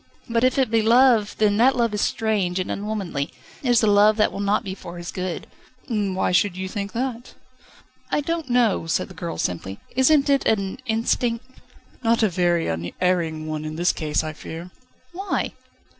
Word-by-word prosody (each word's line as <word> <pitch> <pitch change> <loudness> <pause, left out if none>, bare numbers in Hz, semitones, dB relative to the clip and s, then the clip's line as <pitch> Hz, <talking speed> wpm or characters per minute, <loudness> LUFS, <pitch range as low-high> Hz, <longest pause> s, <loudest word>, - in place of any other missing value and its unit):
"But 230 0 0
if 255 +2 +3
it 260 -4 +2
be 225 -1 +3
love, 230 -1 +4
then 205 -1 +3
that 255 +4 +5
love 230 -3 +1
is 210 - -1
strange 205 -6 0
and 185 - -2
unwomanly; 200 -9 -3 0.3
it 260 - -2
is 240 -1 +4
a - - +5
love 210 +1 +5
that 215 - +3
will - - -6
not 205 +3 +1
be 190 -3 -5
for 175 -2 -9
his 175 0 -6
good 185 -2 -4 0.3
..." 255 - -32
"Why 200 -6 0
should 180 0 +2
you 190 0 -3
think 200 +1 -5
that?" 245 0 -4 0.7
"I - - +1
don't 330 -1 -3
know," 240 -8 +2
said 165 - 0
the - - -11
girl 170 0 -5
simply. 95 +3 -3 0.2
"Isn't 275 +2 +4
it 275 -1 +3
an 200 0 0
instinct?" 230 +1 0 0.6
"Not 230 0 +3
a 215 - +4
very 175 -1 +1
unerring 160 - -1
one 155 -1 -4
in 155 0 -5
this 175 +2 +2
case, 155 -2 -1
I 155 0 -4
fear." 165 +3 -8 0.4
"Why?" 390 +3 -2
205 Hz, 190 wpm, -23 LUFS, 175-235 Hz, 0.7 s, that